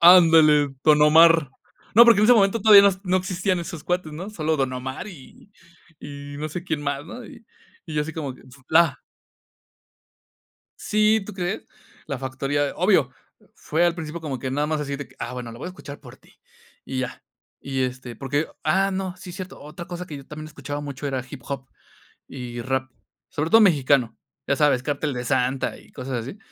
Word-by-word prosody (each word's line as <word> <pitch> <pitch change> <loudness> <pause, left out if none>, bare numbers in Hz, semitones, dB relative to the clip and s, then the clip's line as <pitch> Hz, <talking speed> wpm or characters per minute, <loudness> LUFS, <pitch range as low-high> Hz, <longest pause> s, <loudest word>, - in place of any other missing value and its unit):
Ándale, 160 -5 +7
Don 150 -1 +5
Omar. 160 -1 +6 0.4
No, 235 +3 +10
porque, 230 -3 +6
en - - +5
ese 245 +3 +7
momento 200 +1 +3
todavía, 205 -2 +9
no 190 - -1
no 185 0 +2
existían 185 0 -1
esos 170 -2 -7
cuates, 180 -3 -2
¿no?, 180 +7 -7
solo 160 -6 -1
Don 135 -2 -1
Omar 130 +7 -5
y 175 +2 -14 0.5
y 145 0 -8
no 155 +1 -3
sé 175 +3 -6
quién 160 -5 -2
más, 140 0 -2
¿no? 240 +9 -9
Y 230 - -14 0.4
y 160 - -7
yo 150 - +1
así 160 +2 -6
como 145 -5 -5
que: - - -18
"En 130 - -18
su 135 0 -17
flá". 160 -3 +3 1.8
Sí, 215 +1 +2
¿tú 210 - -8
crees? 185 +2 -3 0.4
La 140 - -4
Factoría, 135 +2 -1
obvio, 180 -8 +3 0.5
fue 160 +3 0
al 175 -1 +2
principio, 165 0 -6
como 145 -5 -4
que 130 +1 -4
nada 145 +2 0
más, 155 -1 -1
así 140 -1 -3
de 145 -1 -7
que, - - -22
ah, 120 - -5
bueno, 125 -2 -6
lo 115 - -10
voy 135 - -7
a - - -4
escuchar 145 -6 -10
por - - -14
ti, - - -25 0.5
y 130 -1 -4
ya. 130 -1 -5 0.4
Y, 135 -1 -3
este, 125 -1 -5
porque, 145 +5 -2 0.2
ah, 195 +6 +2
no, 190 -1 -3
sí, 180 -1 -9
cierto. 185 +1 -8
Otra 160 +4 -9
cosa 175 0 -6
que 155 - -8
yo 140 - -12
también 155 0 -8
escuchaba 145 -1 -6
mucho, 145 -1 -5
era 130 -2 -2
hip 135 0 -10
hop 135 -2 -5 0.6
y 125 -2 -7
rap, 130 +2 -2 0.4
sobre 155 +2 -3
todo 225 - +7
mexicano, 140 - +3 0.3
ya 140 - +2
sabes, 145 -4 +3
Cartel 145 +1 -2
de 125 0 -4
Santa 130 0 0
y - - -19
cosas 130 -2 -4
así. 135 - -8
150 Hz, 205 wpm, -23 LUFS, 135-175 Hz, 1.8 s, No